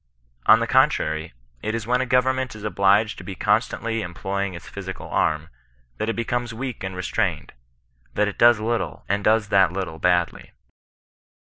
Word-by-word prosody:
On - - +8
the - - +1
con - - +5
trary, 80 -2 -3 0.3
it 110 +1 -2
is 115 -1 -4
when 125 +2 +1
a 130 - -2
government 130 0 +1
is 110 - -10
obliged 105 +1 +2
to - - -9
be 95 - -7
con 105 +3 +3
stantly 115 -2 -4
employing 95 +1 -3
its 85 - -10
physical - - -7
arm, 75 +1 0 0.5
that 110 - -2
it 115 - -1
becomes 120 0 -2
weak 125 -3 -5
and 95 -1 -4
restrained 90 -6 -2 0.3
— - - -39
that 105 - +2
it 105 - -6
does 120 -2 +6
little, 115 +2 -2
and 100 +1 0
does 110 -1 +2
that 95 -4 +4
little 90 -4 -4
badly. 90 0 0
105 Hz, 185 wpm, -23 LUFS, 90-115 Hz, 0.5 s, On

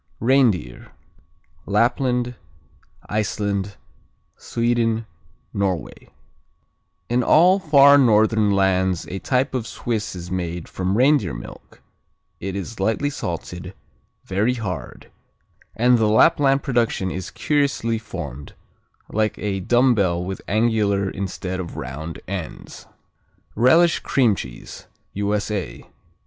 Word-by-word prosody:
Reindeer 115 - +1 0.7
Lapland, 125 +3 +1 0.7
Iceland, 100 -2 -2 0.6
Sweden, 115 -1 0 0.5
Norway 95 -5 -3 1.0
In 120 +1 +1
all 180 - +5
far 145 -4 +6
northern 110 -3 +4
lands 95 -2 +1
a 95 - -4
type 130 +8 0
of 120 -4 -2
Swiss 110 -5 -3
is 90 0 -8
made 85 -2 -3
from 95 +2 -2
reindeer 130 - +3
milk - - -12 0.6
It 95 +1 -5
is 100 +3 -6
lightly 110 +9 0
salted, 90 - -6 0.5
very 105 +6 0
hard; 100 -7 -6 0.6
and 125 +1 +4
the 110 -1 +2
Lapland 135 +4 +4
production 115 -8 0
is 95 - -5
curiously 115 - 0
formed, 75 - -8 0.6
like 110 0 0
a 100 -2 -2
dumbbell 100 -5 +2
with 95 +1 -5
angular 105 -3 +1
instead 95 -1 -4
of 85 -2 -6
round 75 +6 -6
ends. 90 -4 -7 0.7
Relish 160 +9 +4
cream 125 -6 +2
cheese 65 -10 -9 0.3
_U.S.A. 100 -2 -2
105 Hz, 105 wpm, -22 LUFS, 95-120 Hz, 1.0 s, far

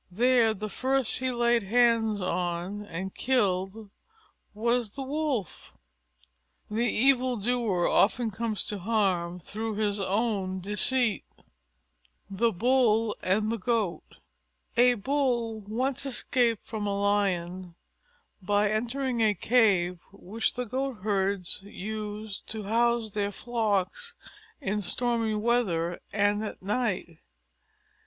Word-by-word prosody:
There 230 +2 +3
the 215 +2 -4
first 260 +4 0
he 260 0 0
laid 240 -1 +2
hands 225 0 +3
on 180 +2 -2
and 190 0 -5
killed 205 -4 0 0.6
was 235 +1 +1
the 270 +6 -6
Wolf. 275 - -3 0.9
The 230 +3 +1
evil 255 0 +3
doer 215 -5 +1
often 225 +2 +2
comes 220 0 -2
to 205 - -4
harm 185 -4 0
through 215 +5 -5
his 205 -1 0
own 195 -1 0
deceit. 210 +4 +1 1.1
THE 230 +4 +2
BULL 225 0 +2
AND 210 +4 +1
THE 230 - -2
GOAT 215 -4 -2 0.6
A 245 +1 +5
Bull 240 -2 0
once 255 +5 -1
escaped 240 -3 0
from 215 -2 -4
a 200 0 -1
Lion 185 -3 0 0.7
by 205 +2 +2
entering 240 +2 -1
a 215 -2 +3
cave 185 -5 +3
which 205 +3 -3
the 250 - -2
Goatherds 205 -7 -1
used 210 +1 -6
to 220 -1 -5
house 230 +1 +1
their 205 0 -1
flocks 225 - -1 0.4
in 210 -7 -1
stormy 230 +1 0
weather 210 -7 0
and 205 +1 +1
at 215 - -6
night. 200 -6 -2
215 Hz, 115 wpm, -28 LUFS, 195-240 Hz, 1.1 s, A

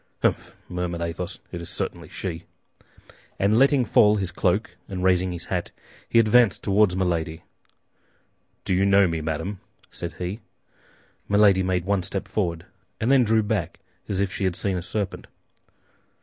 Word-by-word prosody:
"Humph," - - 0
murmured 90 -1 -3
Athos, 85 +1 -4
"it 85 - -5
is 85 - -8
certainly - - -5
she!" 85 -2 -5 0.9
And 105 +4 +3
letting 135 -1 +4
fall 105 0 +5
his 95 -4 -2
cloak 95 +4 0
and 90 -2 -4
raising 90 0 +3
his 85 -1 -6
hat, 90 -2 -2 0.4
he - - +2
advanced 115 -1 +4
toward 100 -2 +3
Milady. 85 -3 -1 1.2
"Do - - 0
you 95 +2 +2
know 100 0 +5
me, 85 -2 -2
madame?" 80 +6 -3 0.3
said 85 -1 -6
he. 90 +5 -5 0.9
Milady 100 -2 +5
made 90 -1 0
one 100 -1 +1
step 95 +2 -4
forward, 85 -5 -2 0.3
and 115 +4 +1
then 135 -2 +6
drew 110 -1 +3
back 105 -4 -2 0.3
as 100 -2 -1
if 100 -1 0
she 95 - -2
had 90 -2 0
seen 95 0 -1
a 90 - -2
serpent. 95 +3 -4
95 Hz, 160 wpm, -24 LUFS, 90-105 Hz, 1.2 s, then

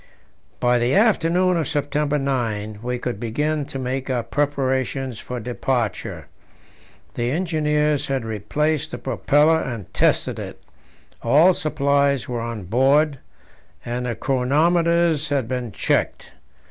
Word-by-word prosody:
By 120 0 +3
the 120 +3 +1
afternoon 185 -4 +3
of 160 - -1
September 150 -1 0
9 115 -7 -2
we 125 +1 -2
could 120 -4 -4
begin 145 +6 -1
to 135 - -7
make 130 +1 -3
our 125 -2 0
preparations 130 -2 -1
for 125 0 -5
departure. 120 -1 -2 0.9
The 120 0 -1
engineers 150 -2 0
had 135 -4 -2
replaced 150 +8 -1
the - - -5
propeller 150 +3 +2
and 115 - -6
tested - - +1
it; - - -7 0.6
all 155 +10 +5
supplies 140 -3 +1
were 120 -2 -3
on 115 -3 -5
board, 135 - +2 0.7
and 125 +1 -3
the 120 - -2
chronometers 160 +4 +2
had 140 -5 0
been 125 -2 -3
checked. - - -1
135 Hz, 125 wpm, -22 LUFS, 120-150 Hz, 0.9 s, all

